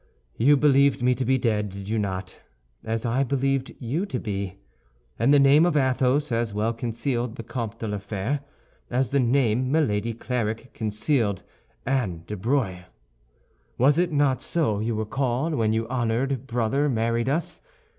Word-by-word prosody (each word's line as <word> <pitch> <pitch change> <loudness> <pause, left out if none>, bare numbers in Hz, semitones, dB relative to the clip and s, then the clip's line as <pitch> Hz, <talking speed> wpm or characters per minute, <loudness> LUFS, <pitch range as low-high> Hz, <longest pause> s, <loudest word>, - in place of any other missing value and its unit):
"You 140 +5 +4
believed 140 -2 +4
me 125 0 +4
to 130 - -2
be 130 +2 +2
dead, 105 -4 0
did 100 0 -8
you 110 +1 0
not, 95 -2 -4 0.4
as 115 +1 -2
I 120 +4 +1
believed 135 0 -1
you 145 - -2
to - - -3
be? 100 -3 -4 0.6
And 140 - +3
the 145 - +7
name 140 +3 +6
of 175 -3 +2
Athos 130 +1 +2
as 115 -2 -1
well 110 +2 0
concealed 120 +1 -2
the 115 - -7
Comte 115 -2 -5
de 115 - -4
la 105 -1 -2
Fère, 105 +7 -2 0.5
as 125 -1 0
the 140 - +3
name 125 0 +2
Milady 115 -7 +1
Clarik 115 0 -3
concealed 110 - -1 0.4
Anne 110 -11 -1
de 105 - -5
Breuil. 100 -4 -1 0.9
Was 140 +6 +4
it 175 -1 +1
not 145 -3 +2
so 145 -12 0
you 110 +1 -1
were 110 0 -2
called 135 +6 -1
when 110 -6 +1
your 110 +1 0
honored 130 +2 -1
brother 125 +5 +1
married 115 0 0
us? 165 +5 -2
120 Hz, 165 wpm, -25 LUFS, 110-135 Hz, 0.9 s, the